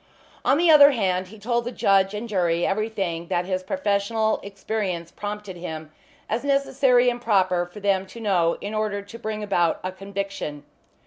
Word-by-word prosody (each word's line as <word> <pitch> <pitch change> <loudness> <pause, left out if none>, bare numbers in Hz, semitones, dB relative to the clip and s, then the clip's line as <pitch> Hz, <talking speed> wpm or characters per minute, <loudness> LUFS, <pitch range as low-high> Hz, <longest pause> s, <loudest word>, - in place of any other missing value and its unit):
On 275 - +3
the 340 0 +5
other 290 -2 +9
hand 185 -5 0
he 220 +4 -13
told 235 +3 -1
the 245 - -4
judge 195 -3 +2
and 220 +3 -4
jury 175 -5 +1
everything 195 -5 -2
that 180 -1 0
his 185 0 -1
professional 215 -1 0
experience 195 -4 -4
prompted 205 -2 -6
him 160 -3 -7 0.4
as 225 +3 -2
necessary 270 -3 +3
and 245 0 0
proper 185 -6 +2
for 190 +4 -12
them 195 -1 +1
to 235 - -11
know 180 -6 +1
in 205 +2 -5
order 210 -2 -1
to 225 +3 -11
bring 215 -1 -4
about 175 -5 +1
a 185 - -2
conviction. 195 -6 -5
200 Hz, 175 wpm, -24 LUFS, 185-220 Hz, 0.4 s, other